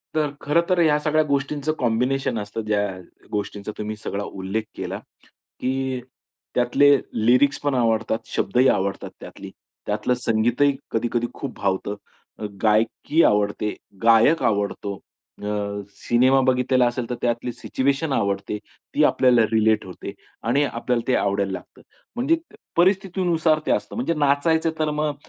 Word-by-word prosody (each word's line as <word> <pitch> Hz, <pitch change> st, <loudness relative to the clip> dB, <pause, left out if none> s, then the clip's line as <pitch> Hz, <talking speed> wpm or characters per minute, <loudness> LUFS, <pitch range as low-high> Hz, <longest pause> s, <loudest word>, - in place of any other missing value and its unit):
तर 155 Hz, -2 st, +1 dB
खरं 150 Hz, +4 st, +3 dB
तर 180 Hz, -1 st, +3 dB
ह्या 155 Hz, -3 st, +4 dB
सगळ्या 155 Hz, +1 st, +2 dB
गोष्टींचं 140 Hz, +2 st, -1 dB
कॉम्बिनेशन 125 Hz, +1 st, 0 dB
असतं. 105 Hz, +2 st, -5 dB
ज्या 105 Hz, -1 st, +1 dB, 0.4 s
गोष्टींचा 105 Hz, 0 st, -4 dB
तुम्ही 105 Hz, 0 st, -4 dB
सगळा 100 Hz, +1 st, -3 dB
उल्लेख 95 Hz, +3 st, -3 dB
केला, -, -, -4 dB, 0.6 s
की 130 Hz, 0 st, -1 dB, 0.5 s
त्यातले 135 Hz, +4 st, +5 dB, 0.3 s
लिरिक्सपण 140 Hz, +3 st, +3 dB
आवडतात, 115 Hz, -2 st, +1 dB
शब्दही 125 Hz, +6 st, +2 dB
आवडतात 100 Hz, -3 st, 0 dB
त्यातली, -, -, -10 dB, 0.3 s
त्यातलं 105 Hz, +4 st, 0 dB
संगीतही 120 Hz, +4 st, +2 dB, 0.2 s
कधी-कधी 120 Hz, +1 st, 0 dB
खूप 135 Hz, -3 st, -6 dB
भावतं. 100 Hz, +1 st, -1 dB, 0.4 s
अ, 110 Hz, -, -4 dB, 0.2 s
गायकी 115 Hz, +9 st, +2 dB
आवडते, 105 Hz, 0 st, +1 dB, 0.3 s
गायक 115 Hz, +8 st, +5 dB
आवडतो. 100 Hz, -1 st, 0 dB, 0.5 s
अ, -, -, -3 dB, 0.5 s
सिनेमा 130 Hz, +3 st, +3 dB
बघितलेला 130 Hz, 0 st, +3 dB
असेल 120 Hz, -1 st, -3 dB
तर 125 Hz, -, -2 dB
त्यातली 120 Hz, +1 st, -1 dB
सिच्युएशन 135 Hz, +4 st, -1 dB
आवडते. 100 Hz, -1 st, -1 dB, 0.4 s
ती -, -, +4 dB
आपल्याला 125 Hz, -2 st, +4 dB
रिलेट 110 Hz, -1 st, +3 dB
होते. 90 Hz, -2 st, -8 dB, 0.3 s
आणि 130 Hz, +5 st, +2 dB
आपल्याला 120 Hz, -3 st, -2 dB
ते 130 Hz, -, +3 dB
आवडायला 100 Hz, -1 st, 0 dB
लागतं. 95 Hz, -1 st, -9 dB, 0.3 s
म्हणजे 275 Hz, +7 st, +2 dB, 0.4 s
परिस्थितीनुसार 175 Hz, -4 st, +2 dB
ते -, -, +1 dB
असतं. -, -, -1 dB
म्हणजे 235 Hz, -8 st, 0 dB
नाचायचं 155 Hz, +2 st, +2 dB
तर 155 Hz, -1 st, +1 dB
मग 150 Hz, 0 st, -1 dB
125 Hz, 135 wpm, -23 LUFS, 110-145 Hz, 0.6 s, त्यातले